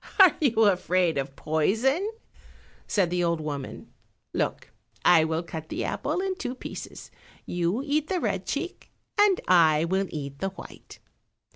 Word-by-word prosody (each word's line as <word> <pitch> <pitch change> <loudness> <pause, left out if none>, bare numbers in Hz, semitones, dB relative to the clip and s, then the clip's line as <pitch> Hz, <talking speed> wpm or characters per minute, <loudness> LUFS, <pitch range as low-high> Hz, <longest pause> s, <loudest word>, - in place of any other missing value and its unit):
"Are 375 -5 +8
you 235 -6 +3
afraid 180 -5 +2
of 135 0 -4
poison?" 235 - +1 0.8
said 185 -5 +1
the 180 0 +1
old 170 -1 +1
woman; 145 -3 -6 0.4
"look, - - -2 0.3
I 165 -3 +7
will 160 +1 -1
cut 160 -2 -7
the - - -3
apple 315 +6 -2
in 385 0 -1
two 255 -10 -4
pieces; - - -8 0.3
you 175 +8 -1
eat 300 +1 0
the 375 -2 0
red 195 - -2
cheek, 350 +6 -4 0.3
and 410 -3 +5
I 165 -3 +5
will 190 +3 0
eat 140 -2 -6
the 195 - -1
white." 190 - -12
185 Hz, 150 wpm, -26 LUFS, -, 0.8 s, Are